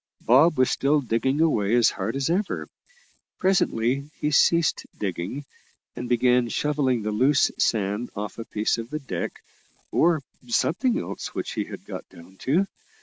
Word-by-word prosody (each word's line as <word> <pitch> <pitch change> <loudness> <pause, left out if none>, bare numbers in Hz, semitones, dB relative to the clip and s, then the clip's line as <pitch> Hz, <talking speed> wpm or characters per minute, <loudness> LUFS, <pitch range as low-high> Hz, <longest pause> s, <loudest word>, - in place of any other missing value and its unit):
Bob 150 +7 +5
was 130 -1 +3
still 145 +2 +2
digging 130 +3 0
away 115 -9 +2
as 120 -2 +5
hard 105 +5 -3
as 135 -1 0
ever. 190 +5 -1 0.7
Presently 140 -7 +1
he 150 - 0
ceased 170 +1 +3
digging, 100 +8 -4 0.5
and 125 - -5
began 125 0 +3
shovelling 135 -4 0
the 105 - -1
loose 135 +7 +3
sand 105 +2 0
off 105 +2 -5
a 115 - -5
piece 110 +2 -1
of 115 +1 -6
the 155 - -3
deck 95 - -5 0.5
or 165 -4 +3 0.2
something 200 - +1
else - - -6
which - - -3
he - - -2
had - - -10
got - - -8
down 90 +3 -15
to. 160 - +1
130 Hz, 155 wpm, -25 LUFS, 110-150 Hz, 0.7 s, Bob